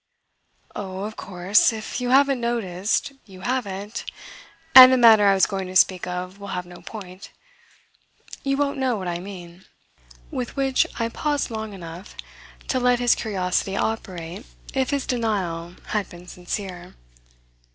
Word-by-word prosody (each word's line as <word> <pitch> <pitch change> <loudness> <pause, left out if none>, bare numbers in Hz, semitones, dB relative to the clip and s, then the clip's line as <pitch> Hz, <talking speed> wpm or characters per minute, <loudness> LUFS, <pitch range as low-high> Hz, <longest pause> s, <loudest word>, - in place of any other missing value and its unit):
"Oh, 190 -1 -5
of 215 +1 -5
course, 190 +4 +2
if 220 +2 -5
you 245 - -1
haven't 270 -1 +4
noticed, 215 -1 -1 0.2
you 190 -2 -13
haven't, 210 -4 -3 0.7
and 255 0 +12
the 260 - +4
matter 220 -4 +7
I 195 - +5
was 190 - +4
going 195 -2 -4
to 185 - -9
speak 185 -1 +4
of 180 +2 -5
will 200 - -8
have 180 - -4
no 175 0 -13
point. 190 -3 -10 1.1
You 275 0 -1
won't 280 -1 -1
know 260 -2 +1
what 190 -3 -5
I 170 0 -2
mean." 180 -1 -10 0.7
With 255 -5 -4
which 270 -2 +2
I 230 - +1
paused 290 +1 -2
long 220 -1 -5
enough 175 0 -10 0.5
to 260 - +1
let 250 0 +3
his 245 -1 +3
curiosity 195 -2 -1
operate 185 -3 -4 0.3
if 265 -1 0
his 280 -2 -1
denial 185 -8 -2
had 210 -3 -1
been 175 0 -12
sincere. 180 0 -6
200 Hz, 150 wpm, -23 LUFS, 180-245 Hz, 1.1 s, and